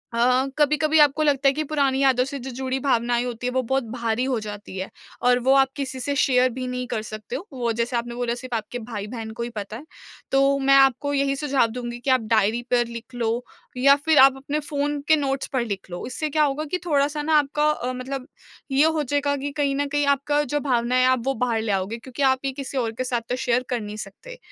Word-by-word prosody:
अ - - -2
अ, 250 +2 +3
कभी-कभी 300 +1 +3
आपको 295 +1 +4
लगता 280 -2 +2
है - - 0
कि 310 +2 -2
पुरानी 275 -3 +1
यादों 260 -2 +4
से 280 +1 -5
जो 265 +1 -7
जुड़ी 260 +1 -3
भावनाएँ 240 -2 +1
होती 245 0 -4
है - - -1
वो 260 - +2
बहुत 265 +2 0
भारी 235 0 -1
हो 260 -3 0
जाती 205 -2 -8
है 190 +1 -4 0.3
और 245 0 +4
वो 270 - +6
आप 270 -1 +5
किसी 265 -2 -4
से 285 +3 -2
शेयर 255 -2 +3
भी 255 +1 -5
नहीं 250 0 -3
कर 220 - -2
सकते 215 +2 -7
हो। 350 +9 -6
वो 240 -3 -1
जैसे 235 +2 -2
आपने 235 0 -4
बोला 240 -1 -1
सिर्फ़ 250 -1 -5
आपके 225 +2 -4
भाई-बहन 220 0 -6
को 230 +1 -5
ही 235 - -4
पता 210 +1 -5
है, 285 - -12 0.5
तो 275 +1 +3
मैं 275 0 +4
आपको 275 +1 +4
यही 275 0 +1
सुझाव 275 -4 +1
दूँगी 240 0 -5
कि 265 - -3
आप 255 -2 +4
डायरी 220 +2 +3
पर 240 -1 +3
लिख 235 +1 -9
लो, 235 0 -1 0.3
या 275 +2 +6
फिर 320 -2 +4
आप 270 0 +7
अपने 285 +3 -3
फ़ोन 290 0 -2
के 315 - +6
नोट्स 275 -2 -1
पर 260 - +2
लिख 200 -4 -5
लो। 175 - -5
इससे 305 +5 -3
क्या 305 +1 +2
होगा 290 +1 0
कि 365 - +1
थोड़ा-सा 295 -1 +1
ना 310 0 +3
आपका 295 +1 0
अ, 255 -4 -3
मतलब 255 +1 -5 0.4
ये 280 +3 +4
हो 320 -1 +1
जाएगा 285 +1 0
कि 285 +1 -4
कहीं 280 -1 0
न 285 +1 0
कहीं 290 0 0
आपका 280 +1 +2
जो 295 0 -1
भावना 250 -3 0
है 255 0 +4
आप 255 -2 +2
वो 270 - +1
बाहर 230 -2 0
ले 220 -2 -2
आओगे 195 +4 -1
क्योंकि 255 +3 -8
आप 260 -1 +3
ये 270 - 0
किसी 275 0 -6
और 235 -3 0
के - - +1
साथ 245 -2 -1
तो 250 - 0
शेयर 250 -1 0
कर 245 -2 -1
नहीं 210 0 -7
सकते। 470 - -9
260 Hz, 250 wpm, -23 LUFS, 240-280 Hz, 0.5 s, आप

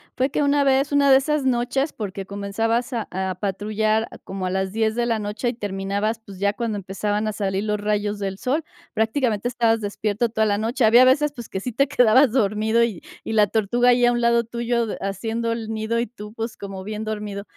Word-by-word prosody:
fue 260 +2 +1
que - - 0
una 285 0 +3
vez, 275 +1 +2
una 280 -1 +4
de 265 - +8
esas 300 +1 0
noches, 260 +4 0
porque 195 -2 -5
comenzabas 225 +6 -2
a 230 -3 -2
a 190 0 -2
patrullar 215 +3 -1
a - - -10
como 190 -1 -6
a - - -1
las 190 0 -1
10 220 0 0
de 240 0 0
la 230 -2 0
noche, 210 +4 -2
y 240 - -2
terminabas, 205 +1 -2
pues, 195 -2 -11
ya 200 +1 +1
cuando 220 -1 -3
empezaban 205 +2 -2
a 215 - -2
salir 195 -1 -1
los 210 -1 -1
rayos 210 0 -1
del 195 -1 -4
sol, 280 +9 -1 0.3
prácticamente 220 0 0
estabas 230 -2 +1
despierto 210 +2 -1
toda 220 -1 +1
la 205 -1 +1
noche. 225 +3 +1
Había 240 +3 +7
veces, 290 +3 +3
pues, 240 -3 -8
que 190 - -3
sí 245 +6 -4
te 275 +5 +2
quedabas 260 -1 +5
dormido 220 0 +2
y 215 -7 -2 0.2
y 225 - -4
la 210 -1 +4
tortuga 230 +4 +2
ahí 245 0 +4
a 240 - +4
un 240 0 0
lado 235 0 +3
tuyo, 235 0 -1
de - - -4
haciendo 225 +4 -2
el 225 -1 -4
nido 220 +1 -1
y 235 - -1
tú, 210 -2 -11
pues, 225 0 -5
como 195 -1 -7
bien 210 +2 -5
dormido. 210 -2 -4
220 Hz, 225 wpm, -23 LUFS, 205-240 Hz, 0.3 s, de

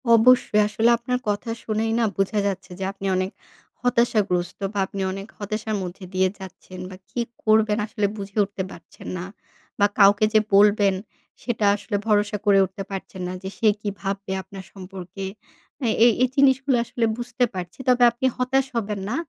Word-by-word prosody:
অবশ্যই 230 -2 +5
আসলে 225 +2 +2
আপনার 250 +2 -2
কথা 210 +3 -2
শুনেই 220 +1 -1
না 230 - +3
বুঝা 195 +2 +1
যাচ্ছে 190 -1 -4
যে - - -3
আপনি 195 - -9
অনেক 185 +1 -1 0.5
হতাশাগ্রস্ত 210 -8 +1
বা 200 - -1
আপনি 195 +1 -6
অনেক 195 +2 -6
হতাশার 215 +1 -3
মধ্যে 185 +2 -7
দিয়ে 185 0 +3
যাচ্ছেন 185 -1 -10
বা 185 - -9
কি 240 - -2 0.2
করবেন? 215 -1 +3
আসলে 215 -2 -2
বুঝে 200 +1 -8
উঠতে 195 -1 -4
পারছেন 170 0 -13
না 175 - -5 0.5
বা 205 - +6
কাউকে 200 +2 +6
যে 215 - +7 0.2
বলবেন 205 -1 +5 0.5
সেটা 225 -4 -1
আসলে 205 0 -4
ভরসা 210 -1 +2
করে 200 -1 +5
উঠতে 190 +1 -7
পারছেন 190 -1 -6
না 180 - -4
যে, 190 - -4
সে 225 - +2
কি 205 - -2
ভাববে 195 +1 -3
আপনার 195 0 -10
সম্পর্কে? 190 0 -8 0.6
এ - - +3 0.2
এই 240 - +7
এই 255 - +3
জিনিসগুলা 270 -1 +4
আসলে 230 0 -1
বুঝতে 245 +1 -2
পারছি 180 +2 -7
তবে 250 -1 +5
আপনি 250 +3 -4
হতাশ 255 +1 +1
হবেন 210 -2 -2
না। 240 - -1
205 Hz, 175 wpm, -23 LUFS, 195-230 Hz, 0.6 s, যে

